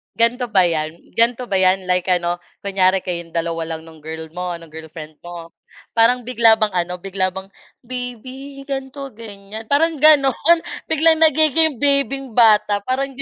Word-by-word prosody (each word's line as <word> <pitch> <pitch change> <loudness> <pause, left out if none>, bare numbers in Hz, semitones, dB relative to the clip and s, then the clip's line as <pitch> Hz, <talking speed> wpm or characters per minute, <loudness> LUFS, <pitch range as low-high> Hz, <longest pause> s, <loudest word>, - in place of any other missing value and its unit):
Ganito 240 +2 +2
ba 195 -5 +3
'yan? 160 -1 -3
Ganito 235 +2 +2
ba 195 - +1
'yan? 190 0 +2
Like 180 0 0
ano, 175 -1 0 0.2
kunyari 190 -1 +1
kayong 170 -2 -6
dalawa 165 -1 -2
lang 160 - -10
nung 160 -1 -15
girl 160 +1 -8
mo, 180 0 -4
ng 165 -1 -13
girlfriend 155 -1 -11
mo, 170 -1 -10 0.4
parang 235 +2 +3
bigla 230 -2 +4
bang 215 -2 0
ano, 180 0 -2
bigla 195 0 -1
bang, 190 +1 -8 0.3
"Baby, 255 +3 -8
ganito, 275 0 -6
ganyan." 215 -1 -9
Parang 315 +1 +1
gano'n 305 +2 +4 0.3
biglang 320 0 +3
nagiging 315 0 +3
baby'ng 275 -2 0
bata 215 -3 +4
parang 270 +2 -1
di - - -4
215 Hz, 160 wpm, -19 LUFS, 175-270 Hz, 0.4 s, bigla